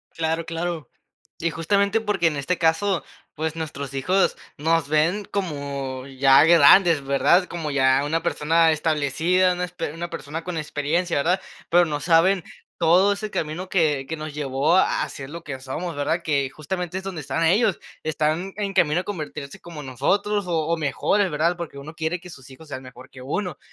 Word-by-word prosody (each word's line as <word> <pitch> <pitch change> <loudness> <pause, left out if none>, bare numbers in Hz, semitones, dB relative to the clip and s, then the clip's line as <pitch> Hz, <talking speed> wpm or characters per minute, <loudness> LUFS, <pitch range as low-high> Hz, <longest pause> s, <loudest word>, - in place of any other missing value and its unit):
Claro, 165 0 -1
claro. 165 -4 -4 0.5
Y 170 0 0
justamente 200 +6 +1
porque 205 -6 +1
en 150 -2 -1
este 140 +6 -1
caso, 165 +3 +1 0.3
pues, 160 +1 -3
nuestros 140 -4 -5
hijos 180 +8 +1 0.2
nos 160 0 +1
ven 165 +7 +1
como 140 -8 -4
ya 135 +1 +5
grandes, 165 -1 +6
¿verdad? 140 +7 +3
Como 165 -3 -4
ya 135 0 +3
una 165 +3 -1
persona 165 +2 +3
establecida, 160 +4 +1
una 180 0 -2
esper 175 -4 -5
una 170 +2 -5
persona 160 +2 -6
con 180 -1 -4
experiencia, 155 +3 -1
¿verdad? 175 +7 +2 0.3
Pero 175 +1 +5
no 150 -3 -3
saben 175 +3 +3 0.4
todo 180 +4 +4
ese 210 +1 -6
camino 170 +3 -3
que 150 -7 +1
que 160 - -4
nos 155 -1 -6
llevó 145 +3 +1
a - - +2
a - - -5
ser 135 -1 -8
lo 170 +1 -8
que 145 -5 -6
somos, 155 +6 -5
¿verdad? 145 +4 -1
Que 140 -4 0
justamente 175 +4 -4
es - - -11
donde 190 -4 -5
están 165 +4 -2
ellos. 200 +3 +3 0.2
Están 155 +4 -1
en 200 -2 -2
camino 170 -2 +3
a - - -11
convertirse 155 -7 -6
como 170 -3 -9
en 140 - -9
nosotros, 200 - 0
o 160 -3 0
o 170 0 +1
mejores, 170 +6 +1
¿verdad? 165 +4 +1
Porque 170 -5 -7
uno 150 +3 -9
quiere 160 +2 -2
que 180 +1 -12
sus 135 -3 -13
hijos 155 +4 -14
sean 130 -2 -6
mejor 130 0 -13
que 130 - -13
uno. 175 +4 -3
160 Hz, 185 wpm, -23 LUFS, 145-180 Hz, 0.5 s, grandes